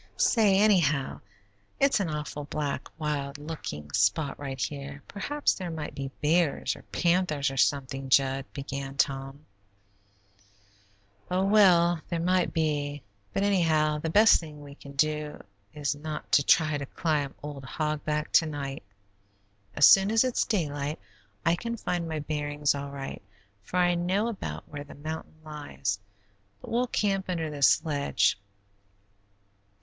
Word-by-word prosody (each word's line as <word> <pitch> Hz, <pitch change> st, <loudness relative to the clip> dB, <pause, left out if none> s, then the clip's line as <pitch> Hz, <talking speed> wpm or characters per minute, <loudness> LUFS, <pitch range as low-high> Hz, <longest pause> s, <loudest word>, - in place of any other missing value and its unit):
"Say, 210 Hz, -5 st, +4 dB
anyhow, 170 Hz, -10 st, +2 dB, 0.6 s
it's 275 Hz, -3 st, +4 dB
an 190 Hz, -5 st, -1 dB
awful 150 Hz, -1 st, -4 dB
black, 145 Hz, 0 st, -3 dB
wild 145 Hz, -2 st, -3 dB
looking 145 Hz, -, -7 dB
spot 100 Hz, -, +1 dB
right 135 Hz, -2 st, -5 dB
here; 140 Hz, 0 st, -5 dB
perhaps 290 Hz, +9 st, 0 dB
there 185 Hz, -2 st, -5 dB
might 160 Hz, -2 st, -5 dB
be 135 Hz, -1 st, -5 dB
bears, 160 Hz, 0 st, +2 dB
or -, -, -12 dB
panthers, 170 Hz, -5 st, +1 dB
or 135 Hz, -, -7 dB
something, 135 Hz, 0 st, 0 dB
Jud," 135 Hz, 0 st, +3 dB
began 140 Hz, 0 st, -6 dB
Tom. 135 Hz, +2 st, -1 dB, 1.8 s
"Oh, 185 Hz, +1 st, +1 dB
well, 175 Hz, -5 st, +5 dB
there 170 Hz, -, -1 dB
might 180 Hz, +1 st, +2 dB
be, 145 Hz, -3 st, -1 dB, 0.3 s
but 195 Hz, -, 0 dB
anyhow 160 Hz, -6 st, +2 dB
the 160 Hz, -, -3 dB
best 210 Hz, +6 st, +6 dB
thing 155 Hz, -3 st, -10 dB
we 140 Hz, -1 st, -10 dB
can 140 Hz, -1 st, -12 dB
do 150 Hz, +1 st, 0 dB, 0.3 s
is 145 Hz, +2 st, -2 dB
not 150 Hz, +1 st, -7 dB
to -, -, +6 dB
try 155 Hz, -1 st, +3 dB
to 140 Hz, -, -5 dB
climb 150 Hz, -4 st, -1 dB
old 145 Hz, -2 st, -7 dB
Hog 150 Hz, +3 st, -2 dB
Back 150 Hz, 0 st, -2 dB
to 160 Hz, -, +5 dB
night. 140 Hz, -2 st, -5 dB, 0.9 s
As 145 Hz, -, +7 dB
soon 195 Hz, +1 st, +7 dB
as 225 Hz, +2 st, +4 dB
it's 255 Hz, -2 st, +1 dB
daylight 150 Hz, -6 st, -1 dB, 0.5 s
I 165 Hz, +1 st, +4 dB
can 235 Hz, +5 st, -4 dB
find 175 Hz, -5 st, -2 dB
my 160 Hz, -, -2 dB
bearings 145 Hz, -1 st, -1 dB
all 140 Hz, 0 st, -5 dB
right, 140 Hz, -1 st, -6 dB, 0.4 s
for 140 Hz, -, -5 dB
I 175 Hz, -1 st, +4 dB
know 185 Hz, +6 st, 0 dB
about 80 Hz, -, -6 dB
where 145 Hz, -1 st, -7 dB
the 145 Hz, -, -13 dB
mountain 155 Hz, +2 st, -6 dB
lies, 150 Hz, -9 st, -4 dB, 0.6 s
but -, -, -10 dB
we'll 245 Hz, +2 st, +1 dB
camp 195 Hz, -4 st, 0 dB
under 165 Hz, -3 st, -2 dB
this 145 Hz, +2 st, +3 dB
ledge. 145 Hz, -8 st, +1 dB
150 Hz, 145 wpm, -28 LUFS, 140-175 Hz, 1.8 s, As